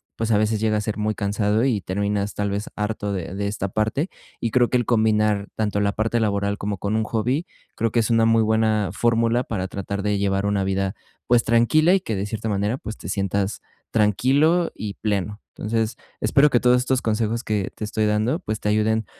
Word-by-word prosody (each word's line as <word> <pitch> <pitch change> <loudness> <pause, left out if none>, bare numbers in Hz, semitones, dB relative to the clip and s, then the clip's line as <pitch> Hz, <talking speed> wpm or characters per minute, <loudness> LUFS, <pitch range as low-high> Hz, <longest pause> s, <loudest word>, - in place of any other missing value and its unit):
pues, 115 0 -2
a 105 - +4
veces 110 0 +1
llega 110 -1 +2
a - - 0
ser 105 0 -3
muy 105 0 -1
cansado 105 +3 +1
y 115 -7 +1
terminas 100 +2 -1
tal 105 0 -1
vez 100 +2 -3
harto 105 -1 -2
de 90 -1 -4
de 100 0 -2
esta 100 -1 -2
parte 110 - -1 0.3
y 115 - -2
creo 125 0 +3
que 125 - +2
el 120 - 0
combinar 110 -3 +2
tanto 105 -2 -1
la 100 0 +2
parte 115 +3 0
laboral 100 -1 0
como 100 0 -3
con 100 +3 -2
un 110 - +1
hobby, 120 +9 -1 0.3
creo 115 -1 0
que 115 - +2
es 115 - +1
una 115 -1 +4
muy 115 0 +4
buena 110 -2 +2
fórmula 115 +2 +2
para 95 -6 -3
tratar 100 +1 -4
de 105 0 0
llevar 100 0 0
una 100 -1 +1
vida, 95 +1 -1 0.3
pues, 120 -1 +4
tranquila 135 +9 +4
y - - +2
que 110 - -3
de 95 +1 -2
cierta 110 +1 -4
manera, 105 +4 0
pues, 110 -4 -7
te 85 - -8
sientas 100 +1 -1 0.3
tranquilo 140 - +3
y 105 -2 -5
pleno. 105 -1 -2 0.2
Entonces 115 +2 -1 0.2
espero 145 0 +4
que 120 - +3
todos 125 0 +5
estos 125 +1 0
consejos 115 +1 -1
que 105 -3 -2
te - - -7
estoy 110 0 -1
dando, 110 +8 +1
pues, 110 0 -4
te 105 - -1
ayuden 110 +1 +1
110 Hz, 215 wpm, -23 LUFS, 100-115 Hz, 0.3 s, todos